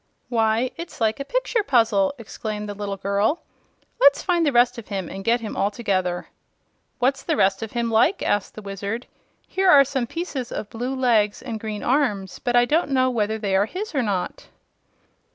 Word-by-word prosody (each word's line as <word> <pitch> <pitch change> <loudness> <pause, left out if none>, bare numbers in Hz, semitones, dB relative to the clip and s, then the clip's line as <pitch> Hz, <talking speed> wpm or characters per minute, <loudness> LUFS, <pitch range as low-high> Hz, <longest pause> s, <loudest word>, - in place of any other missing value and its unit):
"Why, 225 +1 +1
it's 335 +1 -8
like 220 +1 +1
a - - -2
picture - - 0
puzzle!" 230 - +2
exclaimed 215 -2 -5
the 205 - -4
little 200 -1 -4
girl. 200 - 0 0.6
"Let's 280 0 +5
find 350 -3 +2
the 295 - +3
rest 245 0 +3
of 220 - -11
him, 195 -4 -3
and 195 0 -7
get 235 +2 +2
him 220 - -5
all 200 - +1
together." 185 -5 -1 0.7
"What's 270 +2 +1
the 320 - -1
rest 195 -6 +2
of 220 -1 -6
him 235 -1 -1
like?" 230 - +3
asked 205 -1 0
the 215 - -9
Wizard. 200 +4 -4 0.4
"Here 380 0 +1
are 280 -5 +8
some 265 -3 -2
pieces 280 -6 -4
of 210 - -5
blue 245 +4 -3
legs 225 -5 +2
and 230 -4 -5
green 215 -1 -5
arms, 235 -8 0
but 245 -1 -1
I 245 0 +6
don't 310 +4 +1
know 255 -1 +2
whether 220 -2 0
they 200 -3 -1
are 200 +2 +3
his 405 - -5
or 275 - +1
not." 195 -6 -3
230 Hz, 195 wpm, -23 LUFS, 205-270 Hz, 0.7 s, are